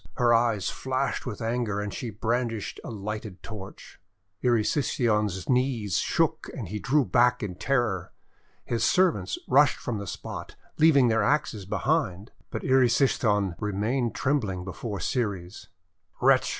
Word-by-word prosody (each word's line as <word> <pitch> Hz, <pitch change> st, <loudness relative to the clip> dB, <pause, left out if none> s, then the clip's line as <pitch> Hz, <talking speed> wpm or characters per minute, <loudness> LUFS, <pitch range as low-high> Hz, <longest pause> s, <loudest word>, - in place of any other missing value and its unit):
Her 120 Hz, -2 st, +4 dB
eyes 115 Hz, -4 st, +2 dB
flashed 130 Hz, 0 st, -2 dB
with 115 Hz, -2 st, -5 dB
anger, 115 Hz, -3 st, -1 dB
and 105 Hz, -1 st, -4 dB
she 120 Hz, -, -4 dB
brandished 115 Hz, 0 st, -2 dB
a -, -, -7 dB
lighted 105 Hz, -2 st, -6 dB
torch. 100 Hz, -4 st, -10 dB, 0.4 s
Erysichthon's 110 Hz, -, +1 dB
knees 125 Hz, -7 st, +1 dB
shook -, -, 0 dB
and -, -, -5 dB
he 105 Hz, +2 st, -4 dB
drew 140 Hz, +4 st, +2 dB
back 125 Hz, 0 st, +3 dB
in 100 Hz, -3 st, -3 dB
terror. 100 Hz, -3 st, -1 dB, 0.5 s
His 115 Hz, -2 st, -1 dB
servants 155 Hz, -, +2 dB
rushed 140 Hz, +2 st, +5 dB
from 115 Hz, -4 st, -4 dB
the 100 Hz, -, -6 dB
spot, -, -, -7 dB, 0.2 s
leaving 140 Hz, -6 st, +6 dB
their 115 Hz, 0 st, +2 dB
axes 110 Hz, -9 st, 0 dB
behind. 125 Hz, -, -1 dB, 0.2 s
But -, -, -5 dB
Erysichthon 120 Hz, -6 st, +3 dB
remained 110 Hz, +4 st, -1 dB
trembling 105 Hz, -10 st, -1 dB
before 100 Hz, +2 st, -5 dB
Ceres. 100 Hz, -, -3 dB, 0.5 s
'Wretch!' -, -, +4 dB
115 Hz, 135 wpm, -27 LUFS, 100-125 Hz, 0.5 s, leaving